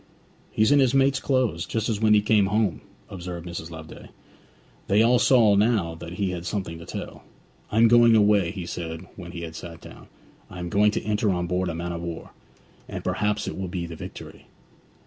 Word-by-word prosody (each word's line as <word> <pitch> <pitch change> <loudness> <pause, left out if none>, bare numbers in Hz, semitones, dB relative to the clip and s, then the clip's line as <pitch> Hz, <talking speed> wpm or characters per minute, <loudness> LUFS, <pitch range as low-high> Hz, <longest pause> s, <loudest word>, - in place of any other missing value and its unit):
'He's 110 +5 +2
in 145 - +6
his 130 -1 +3
mate's 135 0 +3
clothes, 125 -11 0
just 110 -1 -2
as 110 -2 -2
when 105 -1 +5
he 105 - +3
came 105 -2 +3
home!' 105 -4 0 0.3
observed 90 -2 -7
Mrs. 85 -1 -6
Loveday. 80 -1 -11 0.8
They 105 +3 +4
all 120 +1 +4
saw 115 -6 +5
now 100 -5 +2
that 85 +1 -9
he 95 -1 -1
had 85 -2 -5
something 85 -4 -4
to 85 - -11
tell. - - -7 0.5
'I 105 - -1
am 115 +1 +7
going 120 0 +6
away,' 105 -4 +4
he 95 -2 -6
said 85 0 -6
when 90 -2 -9
he 85 - -7
had 80 -1 -7
sat 85 -2 -9
down. - - -13 0.4
'I 90 - -10
am 90 -1 -5
going 105 +3 +4
to - - -2
enter 105 0 0
on 90 -2 0
board 90 +1 -1
a 80 - -4
man 85 +1 -4
of 85 -1 -5
war, 85 -1 -7 0.6
and - - -6
perhaps 105 0 -1
it - - -4
will 95 0 -4
be 90 -1 -4
the 85 -1 -8
Victory.' - - -10
95 Hz, 210 wpm, -25 LUFS, 85-110 Hz, 0.8 s, am